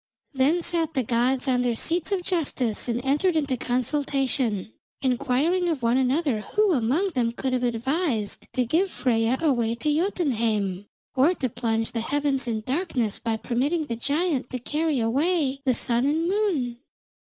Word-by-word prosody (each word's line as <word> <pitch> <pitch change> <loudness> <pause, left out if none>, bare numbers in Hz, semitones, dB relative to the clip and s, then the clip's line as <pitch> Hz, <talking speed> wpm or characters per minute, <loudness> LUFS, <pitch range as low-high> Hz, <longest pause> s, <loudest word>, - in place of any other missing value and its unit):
Then 290 +6 +2
sat 330 -2 -1
the 260 - +1
gods 250 +4 +1
on 250 -1 +2
their 245 -2 +1
seats 330 - 0
of 380 -3 0
justice 275 - 0
and 245 +2 -2
entered 310 +6 +2
into 280 -4 0
consultation, 255 -4 -1 0.3
inquiring 275 +8 +1
of 300 -7 -2
one 235 +2 +3
another 265 -2 +1
who 420 - +1
among 285 - +1
them 245 -6 0
could 260 +2 -3
have 250 - +1
advised 245 - -1
to 250 - +1
give 340 +11 +1
Freyja 235 -4 +1
away 240 -7 +2
to 295 +5 0
Jotunheim, 225 - 0 0.3
or 280 +7 +3
to 260 -6 -2
plunge 225 -1 -1
the 230 - -2
heavens 280 +1 0
in 220 -2 -1
darkness 255 - -1
by 225 -1 -1
permitting 280 +8 -1
the 235 - -3
giant 285 +2 -1
to 255 - -3
carry 300 +3 -1
away 275 +4 +1
the 255 -2 +3
sun 240 +3 +1
and 320 +3 +1
moon. 345 - 0
265 Hz, 165 wpm, -25 LUFS, 235-315 Hz, 0.3 s, one